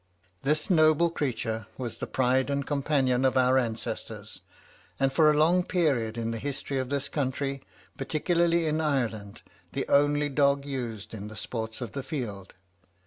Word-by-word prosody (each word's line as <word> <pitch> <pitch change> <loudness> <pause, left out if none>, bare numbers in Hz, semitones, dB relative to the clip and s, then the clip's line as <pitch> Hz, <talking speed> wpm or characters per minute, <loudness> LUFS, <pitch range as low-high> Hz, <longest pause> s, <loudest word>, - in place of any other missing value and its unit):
This 150 +3 +1
noble 160 -1 +4
creature 115 -8 -2
was 120 -3 -5
the - - -3
pride 130 +1 +1
and 140 -1 -1
companion 135 -3 +1
of 130 0 +3
our 130 +1 +4
ancestors, 115 -3 -5 0.6
and 135 0 +2
for 155 0 +5
a 150 - +3
long 170 +4 +4
period 135 -12 0
in 115 0 -2
the 115 - -4
history 135 0 -3
of 130 -1 -3
this 140 0 -1
country, 140 -1 -2 0.4
particularly 170 +4 +1
in 155 0 0
Ireland, 115 -9 -2 0.3
the - - -2
only 145 +1 +3
dog 140 0 +2
used 120 -8 -5
in 105 -1 -6
the 110 - -9
sports 110 +2 -4
of 120 -4 -4
the 135 - -4
field. 115 - -5
135 Hz, 160 wpm, -28 LUFS, 120-150 Hz, 0.6 s, for